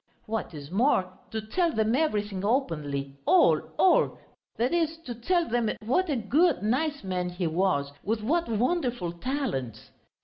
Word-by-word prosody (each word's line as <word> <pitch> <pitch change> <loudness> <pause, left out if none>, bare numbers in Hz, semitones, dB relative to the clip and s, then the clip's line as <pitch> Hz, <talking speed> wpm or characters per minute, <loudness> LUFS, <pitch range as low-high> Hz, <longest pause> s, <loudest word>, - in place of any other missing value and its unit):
What 220 -6 -4
is 145 +1 -9
more, 190 -4 +2 0.2
to 220 - -3
tell 335 +11 0
them 220 +1 +1
everything 210 -10 0
openly, 145 - -1
all, 370 - +5 0.2
all; 375 - +4 0.4
that 245 +6 +1
is, 325 -2 +1
to 245 - -4
tell 340 +9 0
them 235 -1 +1 0.2
what 335 +10 +1
a 290 - +1
good, 275 - +2
nice 280 +6 0
man 180 -1 -2
he 180 0 -3
was, 160 -4 +1
with 215 +1 -1
what 330 +7 +1
wonderful 240 - 0
talents. 170 - -4
225 Hz, 150 wpm, -27 LUFS, 180-290 Hz, 0.4 s, all